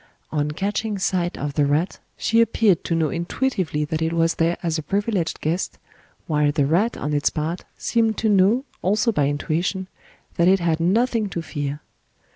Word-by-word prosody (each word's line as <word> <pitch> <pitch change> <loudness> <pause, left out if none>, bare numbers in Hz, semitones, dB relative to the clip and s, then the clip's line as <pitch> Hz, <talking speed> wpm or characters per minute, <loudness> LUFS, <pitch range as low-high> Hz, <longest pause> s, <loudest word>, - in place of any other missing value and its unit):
On 150 -1 0
catching 205 +6 -2
sight 180 -2 -1
of 145 0 -3
the 145 -1 +2
rat, 150 +6 0 0.2
she 230 +1 +3
appeared 215 -5 +3
to 165 - 0
know 160 -2 +1
intuitively 170 - -1
that 155 +1 -3
it 160 +1 0
was 165 0 +2
there 165 +1 +2
as 165 -2 0
a - - -2
privileged 200 -1 -1
guest, 165 +4 -2 0.5
while 150 -2 +2
the 145 -2 +1
rat 185 +11 +1
on 150 +2 -3
its 145 0 +2
part 160 +3 -3
seemed 225 -2 +1
to 220 - 0
know, 210 +6 +4 0.2
also 210 +5 +2
by 145 -9 +1
intuition, 170 +6 -1 0.5
that 170 -1 +4
it 190 +1 +5
had 170 -2 +1
nothing 220 +5 +1
to 170 -2 -4
fear. 145 -1 -4
170 Hz, 180 wpm, -23 LUFS, 155-205 Hz, 0.5 s, it